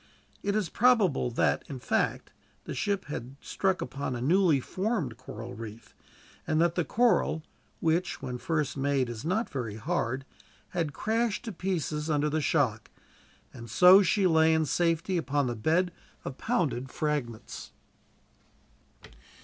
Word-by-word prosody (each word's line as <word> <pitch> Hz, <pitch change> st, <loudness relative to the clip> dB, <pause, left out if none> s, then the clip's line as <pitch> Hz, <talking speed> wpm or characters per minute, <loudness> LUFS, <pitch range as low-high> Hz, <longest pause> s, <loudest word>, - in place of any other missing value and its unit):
It 200 Hz, 0 st, -1 dB
is 215 Hz, -5 st, +1 dB
probable 210 Hz, -, +3 dB
that, 120 Hz, -, +1 dB
in 135 Hz, -, -5 dB
fact, 125 Hz, -, -1 dB, 0.3 s
the -, -, -6 dB
ship 200 Hz, -2 st, -1 dB
had 135 Hz, -2 st, -6 dB
struck 190 Hz, -1 st, -1 dB
upon 130 Hz, 0 st, -4 dB
a -, -, -4 dB
newly 165 Hz, +2 st, +3 dB
formed 185 Hz, -, -2 dB
coral 120 Hz, -1 st, -8 dB
reef; 110 Hz, 0 st, -9 dB, 0.5 s
and 155 Hz, -, +1 dB
that 170 Hz, 0 st, +3 dB
the 175 Hz, -, 0 dB
coral 205 Hz, -7 st, +2 dB, 0.4 s
which, 165 Hz, +3 st, +1 dB
when 125 Hz, -1 st, -5 dB
first 155 Hz, -1 st, -1 dB
made, 135 Hz, -2 st, 0 dB
is 115 Hz, 0 st, -6 dB
not 195 Hz, +9 st, 0 dB
very 115 Hz, -6 st, -4 dB
hard 115 Hz, +4 st, -2 dB, 0.4 s
had 165 Hz, -4 st, -1 dB
crashed 225 Hz, +5 st, -1 dB
to 225 Hz, -, -4 dB
pieces 160 Hz, -5 st, -2 dB
under 150 Hz, 0 st, +1 dB
the 155 Hz, +1 st, 0 dB
shock, 130 Hz, -7 st, +1 dB, 0.6 s
and 115 Hz, -1 st, -10 dB
so 180 Hz, -, +8 dB
she 195 Hz, +1 st, +2 dB
lay 160 Hz, -2 st, +5 dB
in 160 Hz, 0 st, +2 dB
safety 170 Hz, +4 st, +1 dB
upon 145 Hz, -4 st, 0 dB
the 120 Hz, -1 st, -2 dB
bed 165 Hz, +11 st, +1 dB, 0.3 s
of 130 Hz, -, -6 dB
pounded 150 Hz, -, -1 dB
fragments. 135 Hz, -7 st, -3 dB
155 Hz, 145 wpm, -29 LUFS, 130-185 Hz, 0.6 s, so